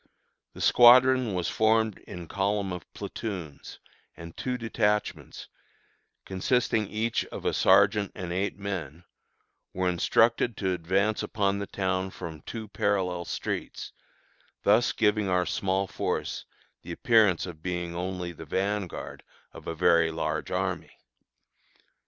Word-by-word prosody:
The - - -9
squadron 125 -2 +6
was 90 -1 -1
formed 110 -1 +2
in 85 -1 -8
column 100 0 -1
of 90 -2 -9
platoons, 90 -10 -6 0.4
and 85 0 -10
two 125 -1 -3
detachments, 110 -2 -2 0.8
consisting 110 +2 0
each 110 +3 -1
of - - -9
a - - +1
sergeant 100 +1 +4
and 85 -2 -5
eight 95 +3 -2
men, 90 -6 -5 0.7
were 95 0 0
instructed 115 +6 +2
to 95 -2 0
advance 95 +5 0
upon 100 -1 0
the 100 - -4
town 95 -1 -1
from 80 -4 -8
two 110 +5 -7
parallel 95 -4 -1
streets, - - -5 0.7
thus 110 +4 +4
giving 105 -2 +1
our 90 -1 +2
small 95 +1 0
force - - -3 0.4
the - - -9
appearance 110 -7 +3
of 85 -4 -9
being 85 -1 -3
only 90 0 -3
the 80 -1 -10
vanguard 100 +2 -3 0.3
of - - -12
a 80 - -3
very 85 -1 +4
large 80 0 -3
army. - - -3
95 Hz, 130 wpm, -27 LUFS, 90-110 Hz, 0.8 s, squadron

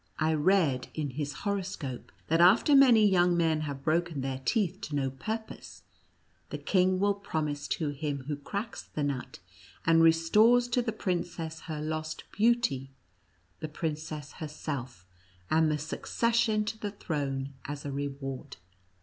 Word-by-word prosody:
I 160 0 +2
read 155 -5 +2
in 150 -3 -2
his 145 +2 -3
horoscope, 185 -10 -3
that 165 +2 +2
after 200 - +6
many 240 -6 +7
young 180 -2 +3
men 160 -2 +2
have 140 -3 -5
broken 165 -2 0
their 130 0 -3
teeth 195 - 0
to 150 - -4
no 135 -2 0
pur 215 - -3
pose, 220 - -12 0.7
the - - -4
king 185 -1 +2
will 200 +1 +3
promise 155 -8 -3
to 155 -3 -1
him 145 -1 -3
who 145 +2 -3
cracks 200 +10 -5
the 150 - -5
nut, 140 -3 -3 0.5
and 165 0 +5
restores 210 +10 +5
to 245 +1 +2
the 235 -2 -2
princess 175 -5 -3
her 155 -1 -3
lost 155 0 -4
beauty, 210 - +2 0.7
the 155 - -5
princess 155 -1 -4
herself, 140 - -6 0.5
and 160 0 +4
the 150 - +1
succession 220 - 0
to 220 +1 -4
the 205 - -3
throne 140 -8 -3
as 145 0 -6
a 140 - -3
reward." 135 -1 -5
160 Hz, 150 wpm, -29 LUFS, 145-195 Hz, 0.7 s, many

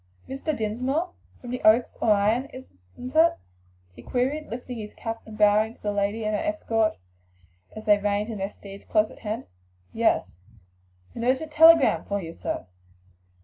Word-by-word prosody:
"Mr. 275 +3 -3
Dinsmore, 255 +11 -1 0.3
from 245 - -8
the 250 - -4
Oaks 225 +3 +4
or - - +2
Ion, 210 +5 +2
isn't 250 - -12
it?" 330 +1 +6 0.6
he - - -13
queried, 275 +5 -1
lifting 245 +1 -6
his 210 -1 -8
cap 225 0 -5
and 215 -1 -10
bowing 215 +2 +3
to - - -29
the 205 - 0
lady 205 +2 -1
and 215 0 0
her - - -1
escort 230 -9 0 0.8
as 215 - -8
they 205 -1 +5
reined 205 +1 0
in 220 -3 -5
their 195 +1 -2
steeds 200 -1 -12
close 215 -1 +1
at - - -14
hand. 215 +1 -4 0.5
"Yes." 85 - +1 0.8
"A 245 +3 +2
telegram 320 -1 +6
for 200 0 -2
you, 165 -3 -7
sir." - - -4
225 Hz, 165 wpm, -25 LUFS, 210-255 Hz, 0.8 s, it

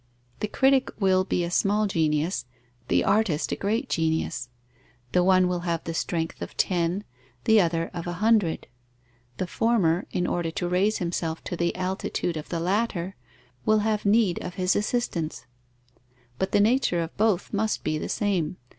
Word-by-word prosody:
The 210 - -1
critic 265 +4 +3
will 190 -2 +3
be 180 -2 -1
a 170 - -3
small 205 +3 +2
genius, 160 -5 0 0.4
the - - +2
artist 195 -6 +1
a - - +1
great 215 +4 -1
genius; 160 -6 -1 0.6
the 180 - +3
one 185 0 +5
will 180 -1 -1
have 170 -1 -2
the 165 - -4
strength 165 0 -2
of - - -7
ten, 175 +2 +1 0.4
the 220 -1 +5
other 165 -1 0
of 170 0 -5
a 175 - -2
hundred; 210 -3 +2 0.7
the - - -1
former, 185 -4 +1
in 180 - -1
order 175 -2 -1
to 175 +2 -3
raise 190 +5 +2
himself 170 -2 -3
to - - -4
the 170 0 0
altitude 185 -2 -2
of 155 - -6
the 170 - -2
latter, 190 0 -1 0.5
will 215 0 +4
have 215 -1 0
need 205 -3 +3
of 180 - -6
his 185 0 +1
assistance; 175 - -2 0.9
but 190 - -1
the - - +3
nature 210 -6 +3
of 165 - -8
both 215 -3 +1
must 215 +1 0
be 155 0 -1
the - - -4
same. 185 -6 0
180 Hz, 170 wpm, -26 LUFS, 170-210 Hz, 0.9 s, one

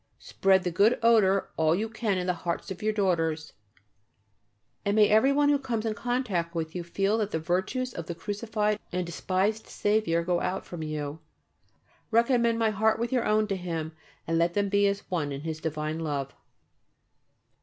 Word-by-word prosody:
Spread 190 -1 +2
the 180 - -1
good 205 +8 +4
odour 205 -4 +4
all 160 0 +3
you 215 +4 -1
can 215 -3 -1
in 180 - -2
the 180 - +1
hearts 170 +2 -4
of 185 - -6
your 215 +1 +1
daughters, 165 -6 0 1.3
and 200 0 0
may 210 -1 +6
everyone 275 +7 +4
who 290 -1 +3
comes 235 -5 -3
in 220 - 0
contact 215 -8 -2
with 160 0 -3
you 180 - -4
feel 195 +5 0
that 210 -2 0
the 160 - -1
virtues 190 +10 -1
of 165 -1 -6
the 170 - -4
crucified 210 +3 -2
and 180 0 -1
despised 190 +5 -1
Saviour 205 -6 +1
go 175 0 0
out 185 - -2
from 175 -2 -7
you. 155 -1 -4 0.9
Recommend 235 0 +3
my 225 -1 +2
heart 220 +1 +2
with 235 +2 -2
your 250 -3 +1
own 215 0 +3
to 195 - 0
Him 165 -4 -4 0.3
and 165 0 0
let 170 +1 +1
them 205 -1 +1
be 200 0 +3
as 200 0 -1
one 155 -5 -1
in 140 0 -5
His 160 0 -4
divine 155 0 -3
love. 145 -4 -3
195 Hz, 185 wpm, -27 LUFS, 170-220 Hz, 1.3 s, may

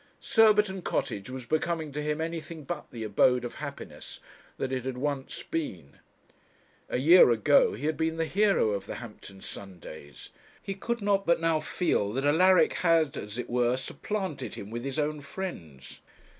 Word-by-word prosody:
Surbiton 210 -4 +4
Cottage 100 - -2
was 130 -1 -7
becoming 155 +1 -1
to 150 +2 -4
him 150 +1 -2
anything 165 -1 -5
but 150 +2 -6
the 115 -2 -7
abode 125 +4 +3
of 120 - -5
happiness - - -8 0.4
that 130 - -3
it 130 -2 -2
had 130 -1 -4
once 140 0 -3
been. 90 - -5 0.9
A - - 0
year 160 +4 +7
ago 120 +5 +4
he 130 +8 -6
had 155 -1 0
been 160 0 -1
the 165 - 0
hero 195 - +2
of 100 -2 -3
the - - -5
Hampton 105 -4 -10
Sundays; 80 -7 -9 0.3
he 195 - -5
could 235 +3 -3
not 200 -1 +1
but 170 - +4
now 165 -1 +2
feel 150 - 0
that 135 +3 -1
Alaric 180 +5 +5
had, 165 -4 +3
as 105 +2 -6
it 125 - -4
were, 125 +1 +1
supplanted 190 +4 -4
him 100 +2 -8
with 120 +1 -4
his 135 +1 -4
own 150 0 -1
friends. 85 - -8
145 Hz, 170 wpm, -28 LUFS, 120-170 Hz, 0.9 s, year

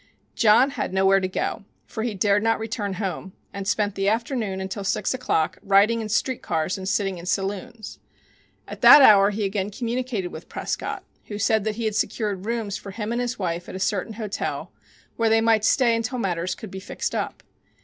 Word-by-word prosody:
John 235 +5 +4
had 275 - -4
nowhere 195 +1 +4
to 185 - -1
go, 185 +2 -3 0.2
for 220 - -6
he 225 -2 -2
dared 200 +1 +2
not 225 +1 +2
return 220 -3 -3
home, 190 -1 -4 0.2
and 195 -1 -5
spent 205 -1 0
the 195 0 0
afternoon 225 -3 -2
until 190 +2 -5
six 195 - 0
o'clock 250 -11 -1
riding 205 +4 +3
in 215 - -5
street 255 +3 0
cars 160 +3 -1
and 190 -1 -4
sitting 195 -3 -1
in 170 - -9
saloons. 200 +3 -4 0.7
At - - -9
that 290 - +10
hour 200 -4 +7
he 205 0 -2
again 195 0 -2
communicated 235 -3 -3
with 160 - -10
Prescott, - - -4 0.2
who 205 - -6
said 210 0 +1
that 215 -1 -1
he 230 0 -3
had 215 - 0
secured 205 -2 -2
rooms 225 -4 -2
for 200 - -10
him 210 +2 -4
and 240 +1 -1
his 245 0 -3
wife 175 -2 -3
at - - -7
a - - -5
certain 205 +2 -1
hotel, 215 -2 -4 0.5
where 230 -1 +2
they 225 0 +4
might 225 -1 +3
stay 235 0 +3
until 230 +3 -2
matters 180 -5 -2
could 220 -5 -10
be 190 - -6
fixed 190 - -4
up. - - -4
205 Hz, 200 wpm, -24 LUFS, 195-225 Hz, 0.7 s, that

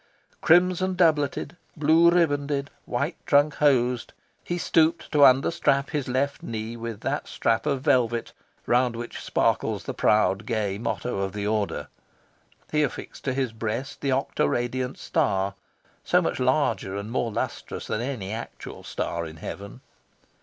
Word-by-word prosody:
Crimson 180 +2 +4
doubleted, 155 -2 +1 0.2
blue 160 +3 +5
ribanded, 145 -4 +1 0.2
white 140 +7 -2
trunk 145 +1 +4
hosed, 125 -4 +2 0.3
he 175 - -2
stooped 165 -1 +2
to 150 -2 +5
understrap 140 +1 +4
his 145 -3 -2
left 135 +3 -1
knee 110 0 -5
with 115 -2 -6
that - - -2
strap 115 +3 0
of 140 -3 0
velvet 120 -5 +1 0.3
round 125 0 +2
which 120 +1 -6
sparkles - - 0
the - - -4
proud 105 0 +2
gay 105 -4 -1
motto 120 -1 -2
of 95 -1 -2
the 100 -1 -3
Order. 105 -1 -1 0.8
He 150 - +2
affixed 145 - -4
to 130 - 0
his 130 -4 -1
breast 115 +5 -4
the 140 - -1
octoradiant 130 -2 -1
star, 95 +1 0 0.5
so - - +3
much - - -1
larger 95 0 +1
and 100 +2 -5
more 120 -2 -1
lustrous - - -4
than 110 - -2
any 120 -7 -4
actual 115 +2 -7
star 85 -1 -3
in 80 0 -10
heaven. 100 +6 -8
125 Hz, 145 wpm, -25 LUFS, 110-145 Hz, 0.8 s, blue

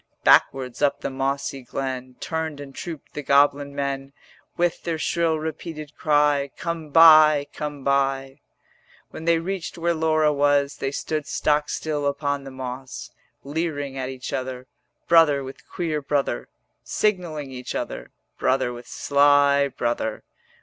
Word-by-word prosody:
Backwards 130 -1 +3
up 145 -1 +2
the - - -3
mossy 135 0 -2
glen 130 0 -5
Turned 160 -3 -3
and 140 -1 -9
trooped 165 -3 -8
the 150 - -4
goblin 140 0 +3
men, 140 -1 -3 0.4
With 175 -1 +1
their 165 -2 -2
shrill 165 0 +1
repeated 155 -1 -6
cry, 145 -2 +2
'Come 170 -2 -4
buy, 155 -2 +7
come 145 -2 -5
buy.' 135 -1 +2 0.2
90 - - -49 0.7
When 160 - -8
they 170 0 +4
reached 180 +1 -4
where 170 0 +1
Laura 155 -1 +2
was 145 0 +2
They 135 - -2
stood 150 +1 -3
stock 150 +1 +1
still 150 -2 -2
upon 140 0 -2
the - - -7
moss, 130 0 -7 0.3
Leering 145 -2 -3
at 130 -1 -3
each 130 -1 -6
other, 130 -1 -4 0.4
Brother 160 -5 +5
with 135 +1 -11
queer 160 -4 -2
brother; 140 0 -1 0.3
Signalling 170 -9 -1
each 125 -1 -6
other, - - -4 0.3
Brother 130 -2 +1
with 120 0 -10
sly 140 0 +4
brother. 120 -4 -2
145 Hz, 145 wpm, -24 LUFS, 135-155 Hz, 0.7 s, buy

